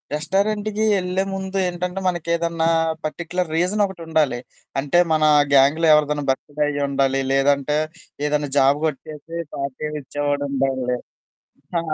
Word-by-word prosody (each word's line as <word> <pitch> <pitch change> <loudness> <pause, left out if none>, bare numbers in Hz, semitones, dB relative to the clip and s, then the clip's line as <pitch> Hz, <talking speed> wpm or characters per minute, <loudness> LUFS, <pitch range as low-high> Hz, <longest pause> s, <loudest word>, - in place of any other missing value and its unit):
రెస్టారెంటుకీ 205 +6 0
యెళ్ళే 185 0 0
ముందు 190 0 -4
ఏంటంటే, 180 +1 -3
మనకేదన్నా 170 -1 0 0.4
పర్టిక్యులర్ 170 +2 -3
రీజనొకటుండాలి. 170 -7 0 0.4
అంటే 145 +5 +3
మనా 155 -1 +4 0.2
గ్యాంగ్‌లో 145 +4 +5
ఎవరిదన్నా 150 -1 +2
బర్త్‌‌డే 145 +3 -3
అయ్యుండాలి, 140 -2 0
లేదంటే 140 +1 +2 0.5
ఏదన్నా 150 -1 0
జాబు 140 +2 +4
గొట్టేసీ 155 +2 -5 0.2
పార్టీ 140 +2 -4
ఇచ్చేవాడుండాలి. 135 -2 -1 0.8
ఆ! - - +1
155 Hz, 100 wpm, -22 LUFS, 140-175 Hz, 0.8 s, గ్యాంగ్‌లో